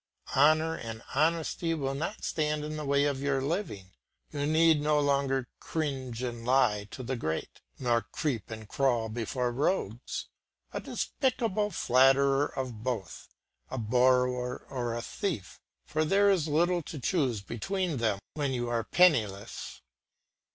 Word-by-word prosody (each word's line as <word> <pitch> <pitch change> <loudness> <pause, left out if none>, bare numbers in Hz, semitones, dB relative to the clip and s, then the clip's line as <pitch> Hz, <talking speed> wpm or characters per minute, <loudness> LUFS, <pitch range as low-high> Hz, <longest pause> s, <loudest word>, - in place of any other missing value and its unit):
Honour 155 +3 +4
and 115 -1 -7
honesty 165 +2 +1
will 135 -3 -2
not 165 +10 -4
stand 150 -1 -1
in 155 0 -4
the 150 -1 -4
way 140 0 +3
of 140 -2 -1
your 140 -1 +1
living. 135 - -3 0.4
You 145 0 -1
need 160 0 +4
no 150 0 +3
longer 140 -3 +1
cringe 130 -6 -3
and 120 -2 -4
lie 120 -5 +3
to 130 - -7
the 130 +2 -2
great, 80 -9 -4 0.2
nor 120 -2 +2
creep 130 -9 -2
and 110 -1 -7
crawl 120 -3 +1
before 120 +2 -2
rogues, 125 - -1 0.5
a - - -2
despicable 230 -6 -1
flatterer 135 -2 +4
of 125 -5 -5
both, 115 -6 -4 0.4
a 130 - -4
borrower 125 +2 +2
or 120 -3 -2
a 120 - -4
thief, 115 - -4 0.2
for 155 +1 0
there 200 +5 +4
is 170 -5 +1
little 175 +4 +2
to 155 - -8
choose 130 - 0
between 170 - -2
them 110 -4 +1 0.2
when 145 -3 -1
you 120 -1 -2
are 115 -1 0
penniless. 115 - +1
135 Hz, 145 wpm, -29 LUFS, 120-155 Hz, 0.5 s, Honour